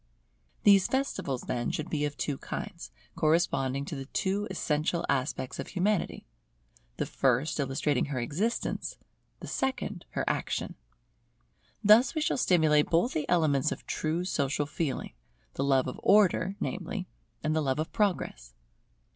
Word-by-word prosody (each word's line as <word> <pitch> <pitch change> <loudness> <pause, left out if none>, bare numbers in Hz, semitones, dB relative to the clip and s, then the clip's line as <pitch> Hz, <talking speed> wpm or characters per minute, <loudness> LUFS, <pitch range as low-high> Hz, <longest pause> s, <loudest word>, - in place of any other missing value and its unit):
These 200 -2 +6
festivals, 265 - -1
then, 120 -1 -2
should 155 - -3
be 150 -2 -1
of 145 0 -4
two 145 -3 -2
kinds, - - -6 0.3
corresponding 140 -4 +1
to 150 - -5
the 135 -1 -6
two 200 +5 -1
essential 165 -1 0
aspects 130 0 -1
of - - -4
Humanity; 200 +1 -1 0.7
the - - 0
first 135 +4 +1
illustrating 140 0 +1
her 145 -2 -4
existence, 180 - -2 0.4
the - - -7
second 265 -1 -2
her - - -1
action. - - -1 1.1
Thus 220 +9 +6
we 310 - 0
shall 300 - +1
stimulate 160 -9 +4
both 175 +10 +2
the 155 - -2
elements 155 -5 +3
of - - -6
true 165 +3 -1
social 145 -4 0
feeling; 150 -1 -3 0.4
the 135 - -2
love 135 -2 +3
of 130 - -5
Order, 195 -2 +4
namely, 185 -3 -3 0.4
and 155 0 +1
the 160 - +2
love 135 -2 0
of 155 +2 -2
Progress. - - -1
155 Hz, 145 wpm, -29 LUFS, 140-190 Hz, 1.1 s, These